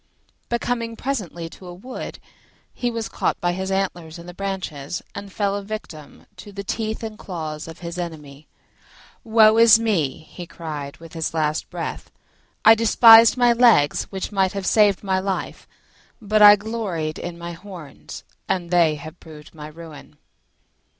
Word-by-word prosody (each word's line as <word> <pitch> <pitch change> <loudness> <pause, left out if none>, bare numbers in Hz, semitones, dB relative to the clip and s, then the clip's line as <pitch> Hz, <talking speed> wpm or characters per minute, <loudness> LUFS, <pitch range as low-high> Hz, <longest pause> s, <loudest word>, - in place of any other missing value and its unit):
But 235 -1 -1
coming 230 -2 -2
presently 200 - -4
to 185 - -13
a 175 - -8
wood, 250 +8 -8 0.6
he 245 - -2
was 230 -1 -4
caught - - -2
by 175 - 0
his 190 +1 -4
antlers 175 -4 -3
in 170 - -11
the 180 - -10
branches, 180 -6 -5
and 200 -1 -8
fell 200 0 -1
a 205 - -3
victim 195 -7 -9
to 205 - -11
the 200 0 -7
teeth 220 +3 -4
and 220 -1 -7
claws 155 -5 -6
of 165 +1 -11
his 170 +1 -6
enemy. 155 -4 -8 0.8
"Woe 220 0 +5
is 230 -1 +8
me!" 175 -11 -1
he 175 +2 -11
cried 150 -5 -7
with 165 -1 -14
his 165 0 -4
last 155 -1 -1
breath; - - -6 0.6
"I 220 - +10
despised 225 +1 +7
my 245 -1 +4
legs, 230 -12 +4
which 190 +1 -6
might 190 -2 +1
have 195 -1 -4
saved 205 -2 +3
my 190 -1 0
life: 190 0 -4 0.5
but 215 -1 +1
I 205 0 +10
gloried 200 -8 -4
in 175 -1 -6
my 170 0 -7
horns, 170 -4 -11 0.3
and 175 -2 -2
they 170 -3 +3
have 155 +3 -11
proved 155 -2 -14
my 150 -2 -9
ruin." 155 -2 -13
190 Hz, 165 wpm, -22 LUFS, 160-215 Hz, 0.8 s, I